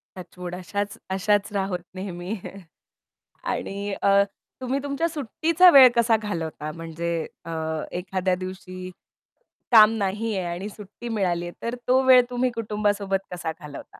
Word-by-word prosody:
Touchwood. 180 0 -8
अशाच 200 +3 -4
अशाच 200 +2 +1
राहोत 195 -2 -1 0.2
नेहमी 185 +1 -5 1.2
आणि 200 +1 -4
अ, 200 0 +5 0.4
तुम्ही 260 +2 -1
तुमच्या 285 +4 -1
सुट्टीचा 325 - +4
वेळ 270 -4 +10
कसा 235 -1 +4
घालवता 160 -6 -4
म्हणजे 165 +1 -5 0.3
अ, 165 - -7 0.4
एखाद्या 185 0 -1
दिवशी 185 0 -7 0.8
काम 215 -2 +9
नाही 210 +3 -1
आहे 180 -2 -2
आणि 190 +4 -5
सुट्टी 210 +3 -10
मिळाली 185 -6 0
आहे. 175 - -6
तर 235 +1 -2
तो 260 +1 +5
वेळ 255 -1 +8
तुम्ही 250 +1 +1
कुटुंबासोबत 205 -3 -1
कसा 165 -2 -3
घालवता? 145 -2 -9
200 Hz, 135 wpm, -24 LUFS, 180-225 Hz, 1.2 s, वेळ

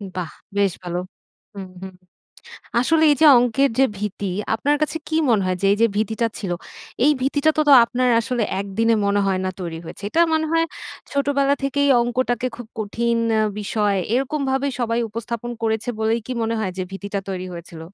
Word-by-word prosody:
বাহ! 180 -3 -4 0.3
বেশ 200 -2 +3
ভালো। 175 0 -3 0.5
হুম, 195 -2 -7
হুম। 190 -1 -8 0.9
আসলে 320 +5 +2
এই 290 - +5
যে 315 - +7
অঙ্কের 245 +3 +2
যে 270 - +6
ভীতি, 205 -1 -4 0.3
আপনার 285 +6 +1
কাছে 305 +1 0
কী 315 - -1
মনে 210 -4 +3
হয়, 185 0 0
যে - - +3
এই 205 - +2
যে 230 - +7
ভীতিটা 220 +2 0
ছিল, 195 - -4 0.5
এই 300 - +6
ভীতিটা 285 +3 +2
তো, - - +3
তো - - +8
আপনার 250 +1 0
আসলে 245 -1 -2 0.2
একদিনে 220 +4 +1
মনে 200 0 +2
হয় 190 -1 +1
না 185 - 0
তৈরি 165 -2 -5
হয়েছে। 180 - -10
এটা 330 - +2
মনে 315 0 +1
হয় 330 0 +3 0.5
ছোটবেলা 280 0 +2
থেকেই 285 +1 +1
অঙ্কটাকে 245 +1 0
খুব 245 - -9
কঠিন 235 +2 -1 0.2
আ - - +3 0.2
বিষয়। 205 -1 0 0.2
এরকমভাবেই 270 0 0
সবাই 230 0 0
উপস্থাপন 230 +2 -5
করেছে 220 +1 -1
বলেই 225 +1 +1
কি 255 - -4
মনে 225 +1 -1
হয় 195 -4 -1
যে - - 0
ভীতিটা 200 +1 -4
তৈরি 185 -1 -4
হয়েছিল? 170 -1 -9
230 Hz, 185 wpm, -21 LUFS, 200-270 Hz, 0.9 s, তো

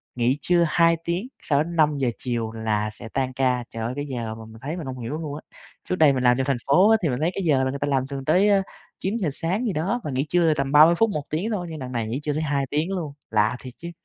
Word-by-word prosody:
Nghỉ 125 +3 +1
trưa 175 -1 +3
2 165 +1 +3
tiếng 175 +8 -2 0.2
sau 145 0 +2
đến 170 +1 -7
5:00 145 -5 +2
chiều 115 -3 -3
là 110 -1 -1
sẽ 115 +2 -8
tan 130 -1 -1
ca, 125 -2 +1
trời 115 0 -5
ơi 120 +3 -2
cái 145 0 -3
giờ 115 -5 -4
mà 110 0 -10
mình 110 0 -13
thấy 155 +6 -4
mình 160 - -6
hông 130 -1 -6
hiểu 115 +2 -5
luôn 150 -3 -5
á. 155 - -7 0.5
Trước 185 - +1
đây 155 -5 +5
mình 130 -1 -1
làm 125 0 +4
trong 130 - 0
thành 135 -3 +1
phố 185 +10 +5
á 225 - +6
thì 155 - +2
mình 125 +1 -2
thấy 170 +3 +1
cái 195 - -3
giờ 140 -5 +3
người 135 +1 -2
ta 145 - 0
làm 135 -1 0
thường 135 -1 -6
tới 185 +7 +4 0.5
9:00 195 -4 -1
sáng 185 - -1
gì 205 - 0
đó, 195 +11 -1
mà 150 - -4
nghỉ 135 +3 -1
trưa 170 -3 +3
tầm 140 -2 -2
30 155 +3 +7
phút, 225 +4 +3
1 150 -7 -3
tiếng 175 +9 -1
thôi, 180 -5 -2
nhưng 155 -2 -6
đằng 130 -1 -6
này 115 -3 -2
nghỉ 125 +5 -2
trưa 150 - -1
tới 155 - -1
2 140 -2 0
tiếng 155 +6 -1
luôn, 160 -7 -3 0.2
lạ 110 +2 +2
thiệt 125 -2 -10
chứ! 170 +1 -7
145 Hz, 285 wpm, -24 LUFS, 125-170 Hz, 0.5 s, 30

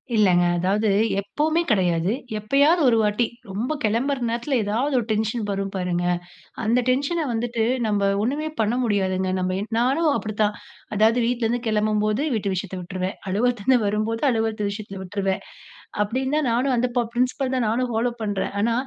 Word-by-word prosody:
இல்லங்க 185 -4 +4
அதாவது 200 +4 +1 0.3
எப்பவுமே 310 +11 0
கிடையாது, 180 -2 +2 0.3
எப்பயாவது 285 +10 +3
ஒரு 230 - +4
வாட்டி 210 +3 +2 0.2
ரொம்ப 225 +10 -2
கிளம்புற 245 +6 +1
நேரத்துல 240 +4 -1
ஏதாவது 240 +8 0
ஒரு 225 - -3
டென்ஷன் 220 +1 0
வரும் 195 0 -2
பாருங்க, 180 -1 -1 0.6
அந்த 235 +3 +3
டென்ஷன 285 +6 +1
வந்துட்டு 230 0 -1 0.2
நம்ப 205 -1 +1 0.2
ஒண்ணுமே 285 +7 -1
பண்ண 220 +2 +1
முடியாதுங்க. 190 -3 0
நம்ம 185 0 -1
என் 210 - -5
நானும் 280 +6 +2
அப்டித்தான் 210 -1 -1 0.4
அதாவது 220 +3 +4
வீட்டுலருந்து 240 0 0
கிளம்பும்போது 215 +2 +1
வீட்டு 200 -2 -1
விஷயத்த 185 0 -4
விட்ருவேன், 185 +1 -4
அலுவலதுலருந்து 240 +4 +2
வரும்போது 215 +4 -1
அலுவலத்து 220 -2 -1
விஷயத்த 200 -1 -7
விட்ருவேன். 195 0 -2 0.6
அப்டின்னு 260 +7 -1
தான் 305 -3 +1
நானும் 255 +3 +1
அந்த 245 +1 +1
பப் 235 -2 +1
பிரின்சிபல் 255 +2 0
தான் 245 -3 +1
நானும் 245 +2 0
ஃபாலோ 230 +2 +1
பண்றேன். 205 -3 -2
ஆனா 230 +2 +2
220 Hz, 155 wpm, -23 LUFS, 200-245 Hz, 0.6 s, இல்லங்க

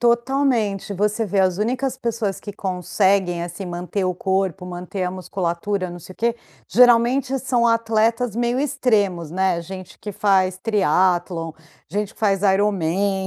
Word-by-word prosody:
Totalmente. 235 -4 +1
Você 210 +3 0
vê 195 -1 +1
as 185 -1 +2
únicas 255 +4 -1
pessoas 230 -5 -2
que 205 - -7
conseguem 190 -1 0
assim 175 +3 -6
manter 180 +2 -3
o 180 -1 0
corpo, 190 -1 -1
manter 180 +1 -4
a 180 - -1
musculatura, 185 +1 -2
não 175 - -8
sei 185 - -12
o - - -22
que, 235 +1 0 0.3
geralmente, 250 +3 +4
são 245 -2 +1
atletas 230 0 +1
meio 240 +1 0
extremos, 210 - 0
né. 185 -1 +1
Gente 185 +1 -9
que 210 - -6
faz 185 -2 +2
Triathlon, 180 -4 +1 0.4
gente 205 +5 -3
que - - -22
faz 200 -2 +2
IronMan, 195 -1 +1
200 Hz, 150 wpm, -21 LUFS, 185-230 Hz, 0.4 s, geralmente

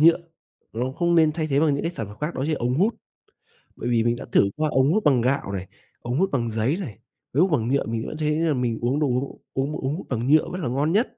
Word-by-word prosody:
nhựa 165 +2 +6 0.5
nó 125 +3 -2
không 170 -1 +2
nên 160 -2 +5
thay 155 0 -2
thế 140 -1 +2
bằng 150 -3 +3
những 140 - -2
cái 170 - -1
sản 115 -10 -5
phẩm 105 +1 -11
khác, 155 +3 -2
đó 130 - -2
chính 155 - 0
là - - -5
ống 125 +1 0
hút. 205 - +2 0.8
Bởi 120 - -4
vì 115 -2 +3
mình 120 0 +2
đã - - -8
thử 100 - +4
qua 155 0 0
ống 135 +1 +3
hút 215 - +1
bằng 135 -6 +4
gạo 130 -5 0
này, 95 -1 -4 0.3
ống 120 +4 -2
hút 190 +1 +2
bằng 120 -3 0
giấy 115 +8 0
này, 115 - -7 0.3
ống 140 - +2
hút 185 0 +3
bằng 110 - -3
nhựa 140 +2 +1
mình 115 0 -3
vẫn - - -6
thấy 150 0 0
là 165 -2 +2
mình 125 -4 -1
uống 125 +5 +1
đồ 150 - +2
uống 125 +2 -2
uống 135 +3 -1
ống 135 +3 -1
hút 180 - -8
bằng 120 -1 -1
nhựa 155 +2 +5
vẫn 180 +1 -5
là - - -1
ngon 140 +6 0
nhất. 230 +5 +1
140 Hz, 290 wpm, -24 LUFS, 120-160 Hz, 0.8 s, nhựa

